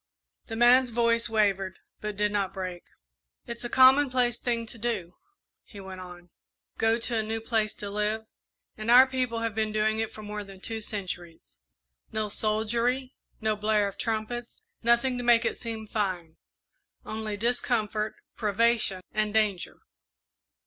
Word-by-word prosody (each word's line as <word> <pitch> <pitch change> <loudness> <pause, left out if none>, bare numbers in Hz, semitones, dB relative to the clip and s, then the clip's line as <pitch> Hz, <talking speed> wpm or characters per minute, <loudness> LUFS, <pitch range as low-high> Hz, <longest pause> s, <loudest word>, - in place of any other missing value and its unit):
The 225 - -5
man's 245 +2 +6
voice 230 0 +2
wavered, 195 -4 +1 0.2
but 210 -1 -5
did 210 0 +1
not 200 -2 -1
break. 185 -2 -5 0.6
"It's 235 0 -6
a 240 - -3
commonplace 255 -2 +5
thing 235 -2 -1
to 230 +1 -10
do," 205 -7 -2 0.5
he 205 - -13
went 190 -1 -8
on, 175 -1 -12 0.5
"go 225 +1 +3
to 235 0 -2
a - - +2
new 220 +1 -2
place 220 -1 0
to 205 - -7
live, 210 +2 -1 0.5
and 215 +1 -5
our 250 +2 +9
people 255 -3 -2
have 230 -1 -1
been 215 0 0
doing 215 +1 +1
it 225 - -1
for 215 - -10
more 210 0 -5
than 195 -1 -12
two 225 +3 -4
centuries. 175 - -6 0.6
No 215 -1 -1
soldiery, 235 +5 0 0.3
no 220 -1 +1
blare 210 0 +2
of 195 - -8
trumpets, 225 +2 -3 0.2
nothing 240 +2 +3
to - - -3
make 235 -1 +5
it - - 0
seem 225 -2 -5
fine 185 -7 -3 0.7
only 215 -1 -4
discomfort, 220 -2 0 0.2
privation, 215 -2 +1
and 215 0 -1
danger. 210 -5 0
220 Hz, 155 wpm, -28 LUFS, 205-235 Hz, 0.7 s, our